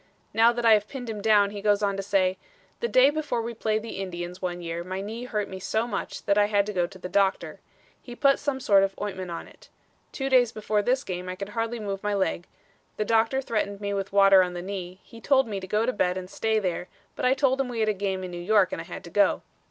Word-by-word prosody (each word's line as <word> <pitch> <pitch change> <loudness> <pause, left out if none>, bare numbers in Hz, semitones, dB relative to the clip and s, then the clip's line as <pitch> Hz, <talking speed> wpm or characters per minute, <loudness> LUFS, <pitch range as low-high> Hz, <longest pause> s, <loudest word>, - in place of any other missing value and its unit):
Now 230 +1 +5
that 240 0 -3
I 225 - +8
have 210 -1 +2
pinned 245 -2 -6
him 210 -2 -6
down, 205 -2 +4
he 205 -1 -6
goes 205 0 +2
on 200 -1 +1
to 195 - -2
say: 190 -1 +1 0.4
"The 470 - -1
day 265 - +5
before 295 -5 -2
we 235 +1 -4
played 220 -1 -1
the 220 -4 -6
Indians 180 -1 -6
one 180 -1 -3
year 170 0 -4
my 185 +1 -5
knee 220 +5 -5
hurt 210 -4 -2
me 190 - -7
so 220 +4 -1
much 210 -5 -5
that 200 0 +3
I 205 - +5
had 205 -1 +2
to 210 - -5
go 175 -2 +1
to 190 +1 -13
the 180 - -6
doctor. 195 +1 0 0.4
He 245 - -10
put 275 +1 +3
some 285 -2 -2
sort 200 -6 +4
of 195 0 -1
ointment 190 -3 -4
on 170 - -6
it. - - -19 0.4
Two 270 - -3
days 250 -3 +4
before 215 -2 -1
this 255 +5 +1
game 180 0 -5
I 185 - -4
could 200 +1 -6
hardly 230 +2 -3
move 200 -2 -4
my 210 0 -1
leg; 190 -2 -1 0.5
the 215 - -1
doctor 230 +5 +2
threatened 205 -4 -2
me 200 -1 -3
with 195 0 -3
water 195 -1 +7
on 180 -1 -1
the 175 - -5
knee; 185 -1 -6
he 230 - -14
told 270 -3 +3
me 205 -3 -3
to 190 - -8
go 210 +4 +1
to 255 - 0
bed 180 -2 0
and 185 0 -7
stay 220 0 0
there, 180 -3 -2 0.3
but - - -6
I 255 +1 +4
told 270 -1 +2
him 270 - -2
we 235 -2 -3
had 215 - +2
a - - +2
game 190 -1 -3
in 180 - -6
New 175 0 -6
York 195 0 +3
and - - -3
I - - -9
had 180 - -8
to 170 - -11
go. 205 +2 +2
205 Hz, 270 wpm, -26 LUFS, 190-230 Hz, 0.5 s, I